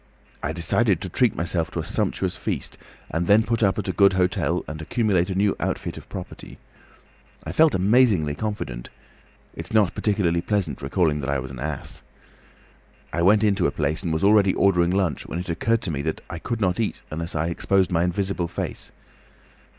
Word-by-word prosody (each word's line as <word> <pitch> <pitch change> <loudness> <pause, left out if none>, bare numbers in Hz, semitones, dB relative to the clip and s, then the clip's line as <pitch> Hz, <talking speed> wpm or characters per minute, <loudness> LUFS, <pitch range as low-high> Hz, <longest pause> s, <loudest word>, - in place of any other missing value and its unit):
I 70 - -2
decided 85 +4 +1
to 95 - -4
treat 120 +4 +2
myself 85 -1 -1
to - - -4
a - - -2
sumptuous - - -1
feast, - - -4 0.4
and 85 +1 -1
then 105 +2 +6
put 115 +1 -1
up 95 -4 +2
at - - -3
a - - +1
good 100 -1 +5
hotel, 90 -1 0
and 75 +1 -6
accumulate 95 0 +1
a 95 - -2
new 100 +1 +2
outfit - - -3
of - - -11
property. - - -8 0.9
I - - -5
felt 160 -2 +4
amazingly 95 - +3
confident; 75 - -4 0.6
it's 80 +1 -8
not 105 -5 +3
particularly 90 -5 +1
pleasant 90 -8 -1
recalling 75 +1 +1
that 70 -1 -4
I 70 - +1
was 65 0 -6
an 65 - -9
ass. 75 +1 -5 1.1
I 85 - 0
went 105 +4 +5
into 100 -4 +3
a - - -1
place 75 0 -1
and 85 -4 -2
was 80 +2 -1
already 100 -1 +5
ordering 90 -3 +3
lunch, 95 -6 0
when 80 - -4
it 90 0 -3
occurred 115 +7 0
to 90 - -2
me 70 -2 -2
that 80 +2 -3
I 85 - -5
could 115 +5 -3
not 90 -1 +1
eat 110 - -2
unless 85 +2 -4
I 80 +2 0
exposed 95 +2 +1
my 85 -1 +2
invisible 90 0 -1
face. - - -5
90 Hz, 195 wpm, -24 LUFS, 80-100 Hz, 1.1 s, then